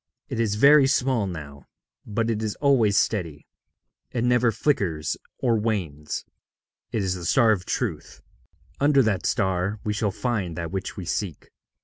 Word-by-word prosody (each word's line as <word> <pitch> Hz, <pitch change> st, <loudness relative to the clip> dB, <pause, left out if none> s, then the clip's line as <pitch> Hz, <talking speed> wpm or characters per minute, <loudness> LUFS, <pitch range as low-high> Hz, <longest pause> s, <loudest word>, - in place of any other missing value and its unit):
It -, -, -3 dB
is 110 Hz, -3 st, +1 dB
very 140 Hz, +4 st, +6 dB
small 130 Hz, -5 st, +1 dB
now, 70 Hz, -6 st, -8 dB, 0.4 s
but 115 Hz, +2 st, 0 dB
it 110 Hz, -1 st, -2 dB
is 110 Hz, -2 st, -2 dB
always 120 Hz, -8 st, +3 dB
steady; 85 Hz, -9 st, -1 dB, 0.6 s
it 120 Hz, -, -2 dB
never 125 Hz, -1 st, +3 dB
flickers 85 Hz, -, 0 dB, 0.2 s
or 120 Hz, -3 st, +1 dB
wanes. 85 Hz, -10 st, -3 dB, 0.7 s
It 110 Hz, -, -1 dB
is 95 Hz, -1 st, 0 dB
the 90 Hz, -2 st, -6 dB
star 115 Hz, +6 st, +4 dB
of 95 Hz, -4 st, 0 dB
Truth. -, -, -3 dB, 0.6 s
Under 140 Hz, -1 st, +4 dB
that 100 Hz, -5 st, 0 dB
star 95 Hz, -1 st, 0 dB
we 105 Hz, -, -1 dB
shall 105 Hz, 0 st, 0 dB
find 100 Hz, -6 st, -2 dB
that 85 Hz, -1 st, -4 dB
which 95 Hz, 0 st, -4 dB
we 95 Hz, -, -5 dB
seek.' 85 Hz, -2 st, -4 dB
105 Hz, 155 wpm, -25 LUFS, 90-120 Hz, 0.7 s, very